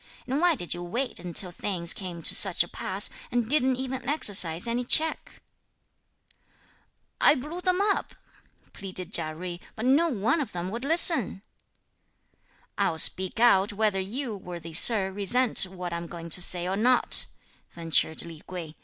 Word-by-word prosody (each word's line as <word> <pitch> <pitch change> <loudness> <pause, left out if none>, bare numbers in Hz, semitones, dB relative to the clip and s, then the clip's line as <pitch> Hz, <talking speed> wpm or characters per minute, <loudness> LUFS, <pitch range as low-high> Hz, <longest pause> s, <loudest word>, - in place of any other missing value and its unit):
and 270 +4 -3
why 350 -2 +2
did 175 -9 -4
you 175 - -8
wait 235 +9 -5
until 180 +1 +4
things 175 -2 -1
came 175 -4 -9
to - - +3
such 190 -4 +4
a - - -12
pass, 190 +3 -3 0.2
and 240 -2 -2
didn't 265 -1 0
even 260 0 -6
exercise 185 - +3
any 240 +2 -3
check?" 315 +6 +1 1.8
"I - - +5
blew 305 +7 -8
them 365 0 -1
up," 405 0 -2 0.6
pleaded 185 -1 -5
Chia 155 -2 -1
Jui, 175 +1 -8 0.2
"but 220 - -6
not 295 +4 +1
one 225 +9 -1
of 275 - -7
them 180 +1 -6
would 235 +3 -6
listen." 310 - +4 1.4
"I'll 160 - -1
speak 185 +5 +1
out, 205 -3 +2
whether 210 -2 -1
you, 225 +5 -5
worthy 175 -4 -10
sir, 195 +2 +4
resent 205 +2 +2
what 180 -2 -8
I'm 170 0 -6
going 170 -1 -10
to 180 - 0
say 175 0 +1
or 190 - -3
not," 245 +5 +4 0.4
ventured 165 -1 -2
Li 165 -2 -12
Kuei. 170 -4 -9
195 Hz, 160 wpm, -25 LUFS, 175-255 Hz, 1.8 s, I